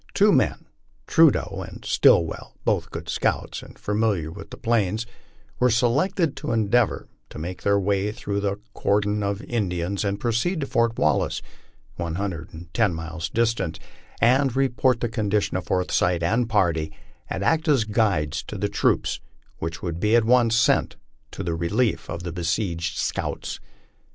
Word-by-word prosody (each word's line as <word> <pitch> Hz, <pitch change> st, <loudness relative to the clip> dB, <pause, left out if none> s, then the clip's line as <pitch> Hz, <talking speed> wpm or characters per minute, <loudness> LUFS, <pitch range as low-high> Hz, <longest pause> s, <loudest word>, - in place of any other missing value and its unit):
Two -, -, +5 dB
men, -, -, +1 dB, 0.4 s
Trudeau -, -, +3 dB
and -, -, -11 dB
Stillvvell, 80 Hz, -1 st, +3 dB
both -, -, +1 dB
good -, -, -7 dB
scouts, -, -, -1 dB
and -, -, -14 dB
familiar 105 Hz, -7 st, 0 dB
with 100 Hz, +3 st, -10 dB
the -, -, -9 dB
Plains, 110 Hz, -1 st, 0 dB, 0.5 s
were 125 Hz, -, +4 dB
selected 145 Hz, -, +2 dB
to -, -, -3 dB
endeavor 115 Hz, +1 st, +1 dB, 0.2 s
to -, -, -10 dB
make 90 Hz, +4 st, -5 dB
their 100 Hz, 0 st, +3 dB
way 100 Hz, +1 st, 0 dB
through 100 Hz, -1 st, -3 dB
the 100 Hz, -1 st, -1 dB, 0.2 s
cordon 105 Hz, +1 st, +1 dB
of 100 Hz, +1 st, -2 dB
In 110 Hz, -6 st, -1 dB
dians 90 Hz, +3 st, -2 dB
and 100 Hz, -1 st, -1 dB
proceed 120 Hz, +10 st, 0 dB
to -, -, -1 dB
Fort 115 Hz, -3 st, +1 dB
Wallace, 75 Hz, -, +1 dB, 0.5 s
one 85 Hz, -2 st, -3 dB
hundred 90 Hz, -4 st, -4 dB
and 85 Hz, +1 st, -11 dB
ten 105 Hz, -7 st, +2 dB
miles 80 Hz, 0 st, -5 dB
distant, 115 Hz, -8 st, 0 dB, 0.4 s
and 130 Hz, +2 st, +3 dB
re 135 Hz, 0 st, +3 dB
port 125 Hz, -1 st, +1 dB
the 120 Hz, -, +1 dB
condition 105 Hz, -2 st, 0 dB
of 95 Hz, -3 st, -2 dB
Forsyth 90 Hz, -1 st, +1 dB
and 115 Hz, +7 st, +1 dB
party, 85 Hz, -7 st, +1 dB, 0.4 s
and 95 Hz, -, -3 dB
act 160 Hz, +7 st, +2 dB
as 140 Hz, -7 st, +4 dB
guides 95 Hz, -8 st, 0 dB
to 105 Hz, -, -6 dB
the 100 Hz, +2 st, -1 dB
troops -, -, +1 dB, 0.4 s
which 80 Hz, +1 st, -5 dB
would 85 Hz, -2 st, -3 dB
be 105 Hz, +5 st, +3 dB
at 115 Hz, -2 st, +4 dB
once 120 Hz, -1 st, +4 dB
sent 120 Hz, +2 st, +3 dB, 0.3 s
to -, -, -6 dB
the 85 Hz, -, -2 dB
relief 100 Hz, +8 st, 0 dB
of 85 Hz, 0 st, -5 dB
the 85 Hz, -2 st, -5 dB
besieged 85 Hz, -1 st, -2 dB
scouts. -, -, -3 dB
100 Hz, 165 wpm, -24 LUFS, 85-115 Hz, 0.5 s, Two